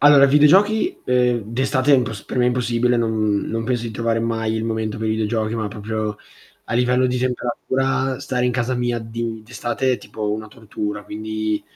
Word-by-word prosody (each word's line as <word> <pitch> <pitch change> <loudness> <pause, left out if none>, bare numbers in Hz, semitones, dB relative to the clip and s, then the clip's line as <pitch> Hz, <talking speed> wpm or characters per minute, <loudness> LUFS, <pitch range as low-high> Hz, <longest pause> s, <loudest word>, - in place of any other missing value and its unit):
Allora, 145 -1 +7
videogiochi, 195 - +4
ehm, 125 -2 +2
d'estate 130 +2 +2
è - - +8
impos 115 -5 -2
per - - -6
me 125 - +4
è - - +4
impossibile, 120 0 +1
non 110 -3 +1
non 115 0 -2
penso 125 -1 -1
di 115 - -4
trovare 115 0 0
mai 115 -1 -1
il 110 - -1
momento 110 -1 -2
per 110 0 -2
i - - +1
videogiochi, 110 +1 -1
ma 110 -1 -2
proprio 105 0 -3 0.5
a 115 - -3
livello 125 +1 +3
di 125 0 -1
temperatura, 130 +1 -1
stare 125 -2 -1
in 125 - +1
casa 125 +1 0
mia 120 -1 -1
di 115 0 -5
d'estate 120 +3 -1
è - - -1
tipo 105 -1 -4
una 110 +1 -3
tortura, 105 -2 -5
quindi 110 0 -3
115 Hz, 195 wpm, -21 LUFS, 110-125 Hz, 0.5 s, è